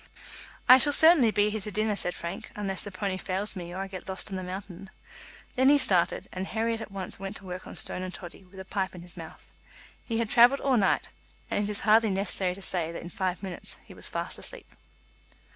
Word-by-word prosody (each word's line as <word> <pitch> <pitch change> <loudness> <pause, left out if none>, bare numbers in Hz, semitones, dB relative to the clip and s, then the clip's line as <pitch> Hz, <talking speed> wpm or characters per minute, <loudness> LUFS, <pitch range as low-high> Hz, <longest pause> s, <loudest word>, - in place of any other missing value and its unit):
"I 255 +1 +10
shall 290 +3 +4
certainly 315 -6 +8
be 210 0 +2
here 215 0 -3
to 210 - -4
dinner," 215 0 0
said 180 -2 -2
Frank, 170 0 -6
"unless 195 -2 -3
the - - -5
pony 195 0 -3
fails 190 +3 -1
me 175 -2 -7
or 185 +2 -5
I - - -6
get 190 -1 -8
lost 190 +2 -3
on - - -3
the 185 - -3
mountain." 185 0 -8 0.7
Then 260 +1 +4
he 290 - +6
started, 180 -9 +3
and 185 +1 -4
Herriot 225 0 -1
at - - -7
once 195 -2 -7
went 195 +1 -6
to 195 - -11
work 180 0 -7
on - - -9
Stone - - -4
and 185 0 -5
Toddy, 185 +1 -10
with 190 +1 -15
a 190 - -8
pipe 190 -1 -3
in 175 - -9
his 175 - -6
mouth. 165 -2 -11 0.6
He 230 - -3
had 230 -1 -1
travelled 245 +4 +6
all 270 -2 +2
night, 195 -3 +1 0.4
and 205 - +1
it - - -3
is 210 - +2
hardly 220 +1 +4
necessary 190 -1 0
to 195 - -9
say 170 -4 -1
that 170 - -7
in 175 - -9
five 185 0 -3
minutes 185 -3 -2
he - - -13
was - - -7
fast - - -3
asleep. - - -8
195 Hz, 235 wpm, -28 LUFS, 185-215 Hz, 0.7 s, I